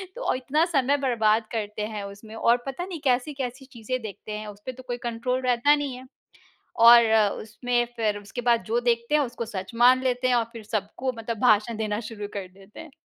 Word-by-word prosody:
तो - - -1
इतना 280 +6 +1
समय 285 -4 +1
बर्बाद 225 -5 +2
करते 210 -2 -4
हैं 205 -1 -4
उसमें, 205 +3 -10
और 235 +2 +3
पता 275 +7 -4
नहीं, 355 -4 -6
कैसी-कैसी 260 0 -1
चीज़ें 245 +1 -4
देखते 210 0 -8
हैं, 210 0 -5
उसपे 210 +5 -8
तो 255 0 -13
कोई 245 0 -3
कंट्रोल 250 +2 -1
रहता 255 +4 +3
नहीं 285 -3 -3
है। 255 +1 -11 0.8
और 235 -1 +9 0.4
उसमें 240 +3 -1
फिर 210 -2 0
उसके 205 +4 -7
बाद 235 -1 +2
जो 230 +2 0
देखते 235 +3 0
हैं, 300 - +4
उसको 235 -2 -4
सच 190 -1 -6
मान 250 +2 +5
लेते 255 0 0
हैं 250 - +3
और 235 -1 +2
फिर 230 -2 -9
सबको 220 +4 -3
मतलब 225 -1 -4
भाषण 220 -1 +3
देना 215 0 -2
शुरू 210 -2 -6
कर 195 -2 -5
देते 195 +2 -15
हैं। 320 -4 -12
235 Hz, 200 wpm, -25 LUFS, 215-255 Hz, 0.8 s, और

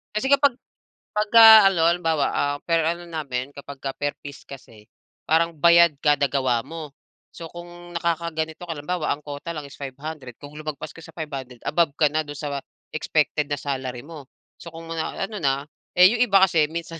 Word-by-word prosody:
Kasi 215 +5 0
kapag 280 -2 +3 0.6
pagka-ano 210 -5 +7
halimbawa, 165 -3 +1
ah, 145 0 0
per 165 -1 +1
ano 170 +1 -2
namin 140 -5 -4
kapag 140 -1 -10
ka 135 - -4
per 145 0 -2
piece 140 -1 -11
kasi, 115 -6 -13 0.4
parang 165 +1 +2
bayad 170 0 +5
kada 145 -1 +3
gawa 130 -4 +1
mo. 160 -3 -8 0.4
So 165 - -8
kung 175 0 -11
nakakaganito 165 -1 -2
ka 165 - -3
lang 145 +1 -10
bawa 180 -4 0
ang 150 - -19
quota 145 +3 -7
lang 150 - -5
is 140 - -13
500 140 -2 -8
kung 145 0 -11
lumagpas 155 -2 -6
ka - - -12
sa 165 -1 -14
500, 135 -6 -7
above 165 -2 +1
ka 150 - +3
na 155 0 0
do'n 145 - -7
sa 145 -2 -4 0.4
expected 150 -1 0
na - - +2
salary 130 -3 -4
mo. 150 -3 -11 0.3
So, 170 - -9
kung 165 0 -10
ma 165 - -3
na - - -3
ano 210 0 -7
na 140 -3 0 0.3
eh, 180 +1 +8
yung 240 0 -1
iba 195 -2 +5
kasi 165 -5 +3
minsan 165 -1 -6
155 Hz, 190 wpm, -23 LUFS, 145-170 Hz, 0.6 s, eh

